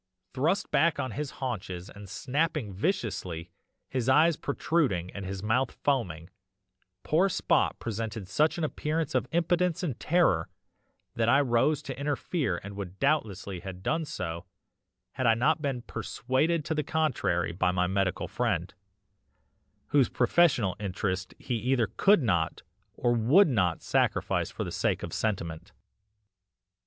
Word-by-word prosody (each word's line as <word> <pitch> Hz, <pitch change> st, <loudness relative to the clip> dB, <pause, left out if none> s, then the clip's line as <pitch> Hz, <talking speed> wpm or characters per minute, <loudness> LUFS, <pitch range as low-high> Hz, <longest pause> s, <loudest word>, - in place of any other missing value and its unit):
"Thrust 155 Hz, +9 st, 0 dB
back 170 Hz, -2 st, +3 dB
on 130 Hz, -, -2 dB
his 145 Hz, +5 st, -3 dB
haunches 95 Hz, -8 st, -4 dB
and 100 Hz, -2 st, -11 dB
snapping 140 Hz, -3 st, -1 dB
viciously, 95 Hz, -, -2 dB, 0.4 s
his 130 Hz, -1 st, -1 dB
eyes 155 Hz, +5 st, +5 dB
protruding 135 Hz, -, 0 dB
and 100 Hz, -1 st, -6 dB
his 95 Hz, 0 st, -5 dB
mouth 120 Hz, +5 st, +2 dB
foaming, 90 Hz, -, -1 dB, 0.7 s
poor 180 Hz, +6 st, +3 dB
Spot -, -, +1 dB
presented 110 Hz, -2 st, -4 dB
such 150 Hz, -, +2 dB
an 170 Hz, -, -2 dB
appearance 155 Hz, 0 st, -1 dB
of 130 Hz, 0 st, +1 dB
impotence 175 Hz, +1 st, +1 dB
and 145 Hz, -9 st, -2 dB
terror 155 Hz, -, +2 dB, 0.6 s
that 115 Hz, 0 st, +1 dB
I 135 Hz, +4 st, +6 dB
rose 140 Hz, +3 st, +2 dB
to 135 Hz, -1 st, -6 dB
interfere 140 Hz, -, -1 dB
and 100 Hz, 0 st, -8 dB
would 95 Hz, -2 st, -6 dB
doubtless 135 Hz, -9 st, 0 dB
have 95 Hz, -1 st, -7 dB
done 160 Hz, +9 st, 0 dB
so, 85 Hz, -, -5 dB, 0.7 s
had 130 Hz, -2 st, -1 dB
I 115 Hz, -, +5 dB
not 150 Hz, +7 st, +2 dB
been 135 Hz, -5 st, -2 dB
persuaded 130 Hz, +8 st, -1 dB
to -, -, -1 dB
the 150 Hz, -1 st, -1 dB
contrary 135 Hz, -, 0 dB
by 90 Hz, +1 st, +1 dB
my 90 Hz, 0 st, +1 dB
medical 95 Hz, 0 st, 0 dB
friend, 95 Hz, -8 st, -1 dB, 1.2 s
whose 140 Hz, -4 st, +4 dB
professional 125 Hz, -, +3 dB
interests 95 Hz, -1 st, -3 dB
he 130 Hz, -, -4 dB
either 125 Hz, +1 st, +1 dB
could 165 Hz, -, +3 dB
not 85 Hz, -8 st, 0 dB, 0.3 s
or 120 Hz, -1 st, +1 dB
would 135 Hz, -, +5 dB
not 90 Hz, -, +1 dB
sacrifice -, -, +1 dB
for -, -, -4 dB
the -, -, -5 dB
sake -, -, 0 dB
of -, -, -5 dB
sentiment. 85 Hz, -, -3 dB
120 Hz, 145 wpm, -28 LUFS, 95-150 Hz, 1.2 s, I